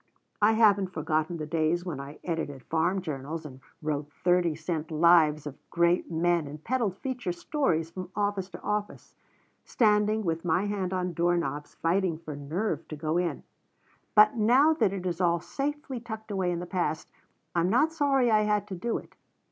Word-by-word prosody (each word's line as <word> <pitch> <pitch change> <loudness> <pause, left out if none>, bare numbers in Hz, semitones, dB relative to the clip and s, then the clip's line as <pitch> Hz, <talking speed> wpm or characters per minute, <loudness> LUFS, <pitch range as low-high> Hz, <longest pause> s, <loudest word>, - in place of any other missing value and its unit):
I 210 +2 +5
haven't 205 -3 +4
forgotten 160 +1 -1
the 155 - -4
days 165 +3 0
when 160 -7 -4
I 140 +2 -8
edited 155 -6 -3
farm 175 +4 0
journals 155 0 -5
and 130 -3 -9 0.2
wrote 150 -1 -2
thirty 175 -3 +3
cent 160 -1 -3
lives 155 -2 +4
of 145 -2 -7
great 170 0 +2
men 170 -1 +1
and 150 +2 -9
peddled 230 -7 -1
feature 250 -8 -3
stories 170 - -1
from 185 0 -7
office 205 -2 -1
to - - -10
office, 210 0 -3 0.5
standing 215 -1 +2
with 165 -2 -1
my 175 +3 +1
hand 200 -3 -2
on 180 -1 -1
door 175 +1 +2
knobs 145 -2 -4
fighting 170 0 +1
for 155 -2 -8
nerve 160 +10 -3
to 155 - -6
go 155 +3 -1
in, 180 -1 -2 0.7
but 210 +1 +7
now 250 +8 +5
that 310 - +2
it 190 -2 -5
is 180 0 -2
all 170 -1 +3
safely 280 - -4
tucked 220 -2 -8
away 190 -3 0
in 175 - -1
the - - -5
past, 175 -3 -2 0.4
I'm 175 +1 +2
not 295 +9 +3
sorry 275 -6 +2
I 215 -1 +5
had 210 -1 +1
to 190 - -4
do 230 +6 -2
it. - - -12
175 Hz, 180 wpm, -28 LUFS, 160-210 Hz, 0.7 s, but